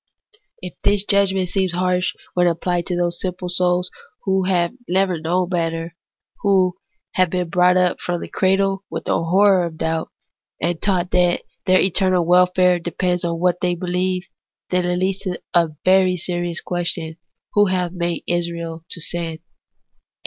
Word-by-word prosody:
If 180 Hz, -, -8 dB
this 205 Hz, -1 st, +3 dB
judgment 195 Hz, -3 st, +2 dB
seems 190 Hz, -2 st, 0 dB
harsh 180 Hz, 0 st, 0 dB, 0.2 s
when 180 Hz, 0 st, +3 dB
apphed 175 Hz, +1 st, -1 dB
to 180 Hz, -, -1 dB
those 175 Hz, -1 st, -1 dB
simple 180 Hz, -1 st, -4 dB
souls 180 Hz, 0 st, +1 dB, 0.3 s
who 190 Hz, -1 st, +1 dB
have 175 Hz, -2 st, +1 dB, 0.2 s
never 185 Hz, -2 st, +1 dB
known 175 Hz, +3 st, 0 dB
better, 165 Hz, -1 st, -2 dB, 0.4 s
who 190 Hz, -3 st, +3 dB, 0.4 s
have 185 Hz, -2 st, +3 dB
been 180 Hz, -1 st, -2 dB
brought 180 Hz, +1 st, +4 dB
up 180 Hz, -1 st, +2 dB
from 175 Hz, -1 st, -2 dB
the -, -, -6 dB
cradle 195 Hz, 0 st, +1 dB
with 165 Hz, -, -6 dB
a -, -, +1 dB
horror 190 Hz, +2 st, +4 dB
of 165 Hz, -2 st, -5 dB
doubt, 160 Hz, 0 st, -2 dB, 0.5 s
and 170 Hz, -1 st, -2 dB
taught 185 Hz, -3 st, 0 dB
that 180 Hz, -1 st, +2 dB, 0.2 s
their 185 Hz, 0 st, +5 dB
eternal 185 Hz, -2 st, +2 dB
welfare 180 Hz, 0 st, +4 dB
depends 180 Hz, +1 st, -1 dB
on 170 Hz, -1 st, -2 dB
what 180 Hz, 0 st, +1 dB
they 180 Hz, -1 st, +1 dB
believe, 180 Hz, +1 st, -1 dB, 0.5 s
then 180 Hz, -1 st, +1 dB
it 180 Hz, 0 st, 0 dB
leads 190 Hz, +1 st, 0 dB
to 185 Hz, -3 st, -4 dB
the 165 Hz, -3 st, +2 dB
very 185 Hz, -1 st, +4 dB
serious 175 Hz, -1 st, -2 dB
question, 170 Hz, -2 st, -2 dB, 0.4 s
Who 205 Hz, 0 st, +4 dB
hath 180 Hz, -2 st, 0 dB
made 170 Hz, -2 st, -3 dB
Israel 170 Hz, -1 st, -3 dB
to -, -, -3 dB
sin 165 Hz, 0 st, -3 dB
180 Hz, 160 wpm, -20 LUFS, 170-185 Hz, 0.5 s, their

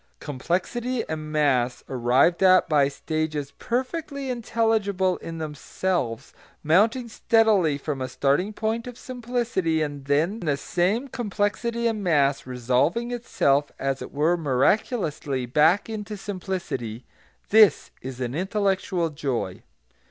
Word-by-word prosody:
Complexity 190 Hz, -, -2 dB
and 155 Hz, -1 st, -5 dB
mass, 130 Hz, -5 st, +1 dB
arrived 130 Hz, +8 st, +2 dB
at 185 Hz, -1 st, +6 dB
by 145 Hz, -3 st, +4 dB
stages 150 Hz, 0 st, -3 dB
perfectly 275 Hz, +2 st, -3 dB
intelligible 220 Hz, -6 st, 0 dB
in 165 Hz, 0 st, -7 dB
themselves, 155 Hz, -4 st, -3 dB, 0.3 s
mounting 220 Hz, -, +3 dB
steadily 215 Hz, -9 st, +3 dB
from 140 Hz, -1 st, -4 dB
a 130 Hz, -, -3 dB
starting 145 Hz, +9 st, +1 dB
point 225 Hz, +2 st, -2 dB
of 245 Hz, -1 st, -8 dB
simplicity; 230 Hz, -10 st, -1 dB
then 145 Hz, +7 st, -1 dB
the 150 Hz, -7 st, 0 dB
same 190 Hz, -, 0 dB
complexity 235 Hz, 0 st, -2 dB
and 220 Hz, -3 st, 0 dB
mass 140 Hz, -6 st, +2 dB
resolving 130 Hz, -, 0 dB
itself 145 Hz, -, +1 dB
as 135 Hz, 0 st, -2 dB
it -, -, -7 dB
were 155 Hz, +5 st, +2 dB
miraculously 150 Hz, -, 0 dB
back 155 Hz, -, +3 dB
into 215 Hz, -1 st, -5 dB
simplicity, 185 Hz, -, -5 dB, 0.4 s
this 215 Hz, -1 st, +5 dB
is 130 Hz, -1 st, -7 dB
an 125 Hz, -1 st, -3 dB
intellectual 190 Hz, -1 st, 0 dB
joy. 130 Hz, -11 st, -3 dB
175 Hz, 115 wpm, -25 LUFS, 140-220 Hz, 0.4 s, at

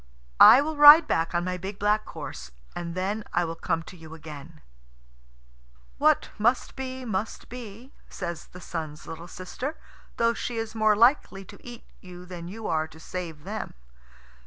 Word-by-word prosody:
"I 260 Hz, -, +10 dB
will 310 Hz, +1 st, -3 dB
ride 295 Hz, +2 st, +10 dB
back 165 Hz, +1 st, 0 dB
on 175 Hz, -, +1 dB
my 180 Hz, 0 st, -2 dB
big 190 Hz, +3 st, -7 dB
black 210 Hz, +1 st, +1 dB
horse, 60 Hz, 0 st, -8 dB, 0.3 s
and 170 Hz, -1 st, -5 dB
then 200 Hz, +4 st, -2 dB
I 175 Hz, 0 st, +2 dB
will 165 Hz, -, -4 dB
come 165 Hz, 0 st, -2 dB
to 175 Hz, -, -12 dB
you 160 Hz, -2 st, -12 dB
again." 155 Hz, 0 st, -11 dB, 1.4 s
"What -, -, +3 dB
must 240 Hz, +4 st, +1 dB
be, 260 Hz, -1 st, -6 dB
must," 215 Hz, -1 st, -4 dB, 0.6 s
says 175 Hz, -3 st, -6 dB
the 180 Hz, -, -13 dB
Sun's 155 Hz, -2 st, -6 dB
little 165 Hz, +1 st, -8 dB
sister; 240 Hz, -, -6 dB, 0.4 s
"though 230 Hz, 0 st, +2 dB
she 235 Hz, 0 st, -5 dB
is 225 Hz, -1 st, -4 dB
more 215 Hz, -1 st, +3 dB
likely 225 Hz, -4 st, +3 dB
to -, -, -15 dB
eat 240 Hz, -1 st, -10 dB, 0.2 s
you 180 Hz, -1 st, -12 dB
than 175 Hz, -2 st, -8 dB
you 215 Hz, +4 st, -8 dB
are 160 Hz, -1 st, 0 dB
to 160 Hz, 0 st, -16 dB
save 165 Hz, -2 st, -7 dB
them. 215 Hz, +3 st, -6 dB
185 Hz, 165 wpm, -26 LUFS, 165-225 Hz, 1.4 s, I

